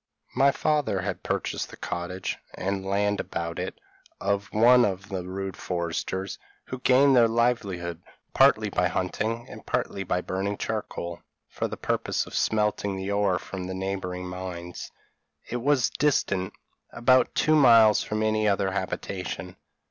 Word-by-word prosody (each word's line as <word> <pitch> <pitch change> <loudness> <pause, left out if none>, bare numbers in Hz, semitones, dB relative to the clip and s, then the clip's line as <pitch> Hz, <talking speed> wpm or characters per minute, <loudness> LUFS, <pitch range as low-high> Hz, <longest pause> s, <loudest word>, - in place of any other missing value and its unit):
My 135 +3 +5
father 145 -9 +1
had - - -4
purchased - - -2
the - - -11
cottage, 90 +2 -4 0.2
and 95 0 -2
land 100 +1 0
about 85 0 -4
it, - - -5 0.4
of 100 -1 -1
one 120 +3 +6
of 95 -1 -2
the 95 -3 -4
rude 95 0 -4
foresters, 90 +2 -3 0.3
who 130 - -6
gain 135 +2 +5
their 120 -3 +6
livelihood 100 -8 0 0.3
partly - - +4
by - - +2
hunting, 110 +5 -2
and - - -10
partly 100 - -2
by 90 -1 -1
burning 95 +3 -2
charcoal, 85 -5 -4 0.3
for - - -3
the - - -6
purpose - - -1
of - - -12
smelting 105 -2 +1
the 95 +1 -3
ore 100 -3 +2
from 95 +1 -6
the 95 0 -4
neighbouring 95 -1 -3
mines; 90 -1 -6 0.6
it 125 - -3
was 135 -3 +2
distant 100 -10 +1 0.4
about 130 +2 +3
two 155 0 +3
miles 115 -7 +7
from 110 0 -2
any 110 0 +2
other 100 -1 +1
habitation. 95 -1 -4
100 Hz, 150 wpm, -26 LUFS, 95-115 Hz, 0.6 s, miles